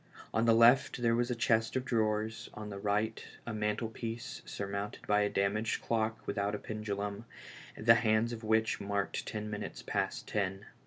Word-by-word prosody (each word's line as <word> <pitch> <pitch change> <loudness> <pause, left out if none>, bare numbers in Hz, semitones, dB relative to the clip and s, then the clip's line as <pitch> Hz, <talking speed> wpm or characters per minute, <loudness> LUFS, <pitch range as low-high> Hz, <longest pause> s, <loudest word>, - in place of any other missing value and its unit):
On 110 - +2
the 115 -1 +6
left 120 +2 +5
there 115 -1 +4
was 120 +1 +1
a 125 - 0
chest 115 -1 +2
of 130 0 0
drawers, 110 -1 0
on 105 -1 -6
the 100 - -6
right 105 +2 0 0.2
a 115 - -4
mantlepiece 110 +2 -3
surmounted 100 +1 -4
by 105 0 +3
a 105 - +2
damaged 100 +3 0
clock 110 -1 -1
without 100 +1 -1
a - - -2
pendulum, 105 0 -4 0.5
the 115 +2 +7
hands 115 0 +2
of 115 -1 -7
which 110 0 +2
marked 100 0 -2
ten 105 -1 -4
minutes 105 - -5
past - - -2
ten. 100 -1 -2
110 Hz, 170 wpm, -32 LUFS, 105-115 Hz, 0.5 s, the